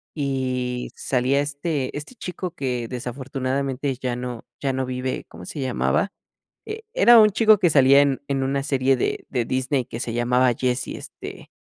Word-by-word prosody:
y 130 -3 -2
salía 130 +2 +1
este 145 -1 -2
este 150 +12 -8
chico 180 -4 -5
que 125 -5 -2
desafortunadamente 130 +2 -3
ya 125 -2 -1
no 125 -2 -6
ya 135 -2 -1
no 130 0 -1
vive, 130 0 -3
¿cómo 90 - -11
se 145 - -6
llamaba? 65 - 0 0.6
E 440 +1 -6
era 240 - +7
un 215 -1 +6
chico 215 +1 +5
que 175 -2 +3
salía 140 -1 +6
en 140 -2 +1
en 135 -1 0
una 135 +1 0
serie 135 -1 +2
de - - -1
de 125 -3 0
Disney 130 0 0
que 115 - -7
se 120 - -3
llamaba 125 +1 +3
Jesse, 125 0 0
este, - - -9
130 Hz, 170 wpm, -23 LUFS, 125-145 Hz, 0.6 s, era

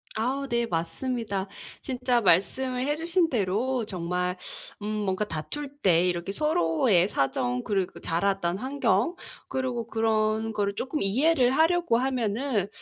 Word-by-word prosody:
아우 265 +5 -1
네 235 -1 0
맞습니다. 200 +3 -2 0.3
진짜 250 -2 0
말씀을 250 +8 +2
해 295 - +1
주신 335 +1 +1
대로 230 +4 0
정말 180 -1 -2 0.5
음 - - -4
뭔가 210 -1 -1
다툴 280 - -5
때 180 -1 +4
이렇게 175 +2 -2
'서로의 185 - +2
사정 125 -2 0
그리고 195 -3 -1
자랐던 180 +1 0
환경 265 - +1 0.3
그리고 250 -3 -2
그런 220 0 +1
거를 200 -1 -1
쪼끔 270 +7 -3
이해를 250 +6 +3
하려고 325 -3 +3
하면은 245 -3 0
220 Hz, 275 characters per minute, -27 LUFS, 185-260 Hz, 0.5 s, 때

